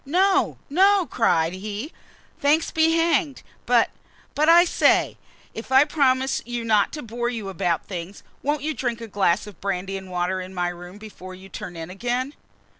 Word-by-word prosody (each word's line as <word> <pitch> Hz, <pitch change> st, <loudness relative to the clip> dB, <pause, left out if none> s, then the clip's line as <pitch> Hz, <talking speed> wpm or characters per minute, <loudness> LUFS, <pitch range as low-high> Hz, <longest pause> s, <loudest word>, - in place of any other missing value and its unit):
"No, 380 Hz, +6 st, +2 dB
no!" 385 Hz, +4 st, +4 dB
cried 165 Hz, -, +1 dB
he, 210 Hz, -, -6 dB, 0.5 s
"thanks 305 Hz, +1 st, +2 dB
be 320 Hz, 0 st, +3 dB
hanged, 330 Hz, -3 st, +1 dB, 0.2 s
but -, -, +3 dB, 0.4 s
but, 305 Hz, +2 st, +2 dB
I 345 Hz, +1 st, +8 dB
say, -, -, +2 dB, 0.4 s
if 225 Hz, +4 st, -8 dB
I 265 Hz, +1 st, +7 dB
promise 265 Hz, -3 st, +1 dB
you 240 Hz, 0 st, -4 dB
not 215 Hz, -3 st, +3 dB
to 300 Hz, -, -6 dB
bore 240 Hz, +1 st, -3 dB
you 225 Hz, -5 st, -5 dB
about 175 Hz, -2 st, -1 dB
things 180 Hz, +1 st, -7 dB, 0.2 s
won't 290 Hz, 0 st, -1 dB
you 310 Hz, +1 st, -1 dB
drink 240 Hz, -4 st, -3 dB
a 230 Hz, -, -7 dB
glass 195 Hz, -2 st, +1 dB
of 205 Hz, -5 st, -13 dB
brandy 195 Hz, 0 st, -2 dB
and 190 Hz, -1 st, -10 dB
water 180 Hz, +1 st, -1 dB
in 185 Hz, +1 st, -9 dB
my 175 Hz, -1 st, 0 dB
room 175 Hz, +2 st, -10 dB
before 195 Hz, -3 st, -10 dB
you 190 Hz, +1 st, -13 dB
turn 175 Hz, -1 st, -8 dB
in 165 Hz, +1 st, -7 dB
again?" 245 Hz, +7 st, -2 dB
230 Hz, 180 wpm, -23 LUFS, 185-290 Hz, 0.5 s, I